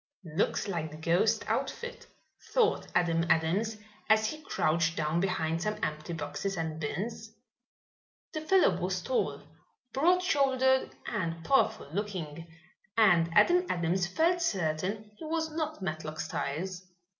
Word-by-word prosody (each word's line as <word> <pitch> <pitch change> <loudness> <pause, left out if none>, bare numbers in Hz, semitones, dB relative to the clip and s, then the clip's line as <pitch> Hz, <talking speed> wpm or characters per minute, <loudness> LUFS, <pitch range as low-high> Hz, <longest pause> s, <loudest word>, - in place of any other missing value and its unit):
"Looks - - +1
like 165 -5 -2
the 155 - -10
ghost 175 +8 +2
outfit," 480 0 -3 0.5
thought 470 -2 +2
Adam 165 -2 +3
Adams, 195 +8 +2 0.3
as 220 0 +5
he 310 +8 -3
crouched 165 - +1
down 155 +2 +1
behind 165 -3 0
some 210 +2 -1
empty 155 +3 -3
boxes 165 +5 -3
and 160 -1 -3
bins. 215 +8 -4 1.0
The 310 - -3
fellow 375 +4 +3
was - - -1
tall, - - -1 0.5
broad 355 +7 +3
shouldered 265 -4 +3 0.2
and 165 -6 -3
powerful 270 - +2
looking, 170 -6 -4 0.5
and 175 -7 +5
Adam 360 - +5
Adams 175 +1 +1
felt 335 - +2
certain 195 - -1
he - - -7
was 320 0 -1
not 310 -7 -3
Matlock 155 -2 -4
Styles. 180 +6 -3
190 Hz, 130 wpm, -30 LUFS, 165-270 Hz, 1.0 s, as